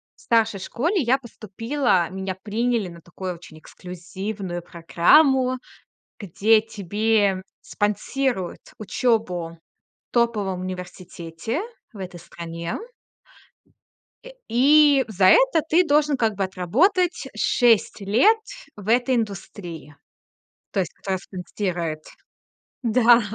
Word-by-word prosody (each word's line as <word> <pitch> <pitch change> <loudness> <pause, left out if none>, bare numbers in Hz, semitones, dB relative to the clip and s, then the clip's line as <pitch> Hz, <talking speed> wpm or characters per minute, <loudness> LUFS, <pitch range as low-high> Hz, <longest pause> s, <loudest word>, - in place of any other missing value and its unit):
в - - -22
старшей 225 -3 +1
школе 325 - -1
я 255 +1 +3
поступила, 230 - -1
меня 190 0 -4
приняли 220 +1 -1
на 170 0 -12
такую 180 +2 -6
очень 165 -2 -14
эксклюзивную 185 +2 -7
программу, 255 - +3 0.6
где 215 +3 +3
тебе 205 -2 0 0.2
спонсируют 210 -1 -2 0.2
учёбу 185 -6 -1 0.5
в - - -71
топовом 210 -6 0
университете 180 - -6 0.3
в 210 - -12
этой 180 -3 -7
стране. 170 0 -6 1.5
Э, - - -10 0.2
и 280 +3 +5
за 195 -3 +1
это - - +5
ты 345 +3 +5
должен 295 -1 +2
как 225 -3 +1
бы 195 - -1
отработать 280 - +1
6 230 -4 +2
лет 235 - +4 0.4
в 205 -1 -11
этой 250 +2 +3
индустрии. 175 -8 -5 0.8
То 200 - -1
есть 180 - -5
кто 190 -1 -3
спонсирует. 180 -4 -4 0.8
Да. 235 +1 +5
205 Hz, 105 wpm, -23 LUFS, 180-245 Hz, 1.5 s, и